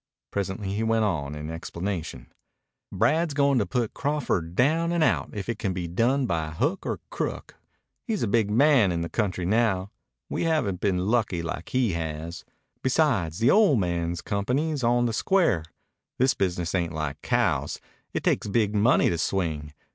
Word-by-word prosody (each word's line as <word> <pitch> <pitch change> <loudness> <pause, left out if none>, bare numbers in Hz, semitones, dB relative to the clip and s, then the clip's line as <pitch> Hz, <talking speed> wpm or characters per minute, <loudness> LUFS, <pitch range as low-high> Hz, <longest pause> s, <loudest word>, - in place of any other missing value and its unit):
Presently 100 0 -3
he 105 - -1
went 115 -1 +2
on, 75 -7 -2
in 75 +1 -6
explanation: 85 -5 -5 0.6
"Brad's 160 -1 +1
goin' 140 -2 +3
to 100 - 0
put 120 -4 -1
Crawford 120 - -1
down 160 - +2
and 170 -2 +2
out - - +1
if 100 -2 -5
it 115 -2 -3
can 95 -3 -1
be 90 -2 -3
done 120 +10 +1
by 80 -7 -1
hook 145 - -1
or - - -3
crook. - - -4 0.5
He's 220 -4 -1
a - - +1
big 105 0 +2
man 120 -3 +4
in 85 -1 -1
the 85 - -3
country 95 -5 -1
now. 100 -2 +1 0.4
We - - -2
haven't 150 - 0
been 100 -3 +1
lucky, 105 -6 +1
like 85 0 -5
he 125 -5 +1
has. 80 0 -4 0.4
Besides, 125 - +1
the 115 +3 +4
ol' 205 -8 +5
man's 85 -4 -1
company's 135 +8 -1
on 120 +1 +3
the 115 - -1
square. 170 - +2 0.5
This 130 +1 +3
business 90 -3 -1
ain't 85 -2 0
like 75 -2 -4
cows. 90 - 0 0.3
It - - -3
takes - - +1
big 105 0 +1
money 110 +4 +4
to 85 - 0
swing. 80 -6 -1
100 Hz, 170 wpm, -26 LUFS, 85-125 Hz, 0.6 s, ol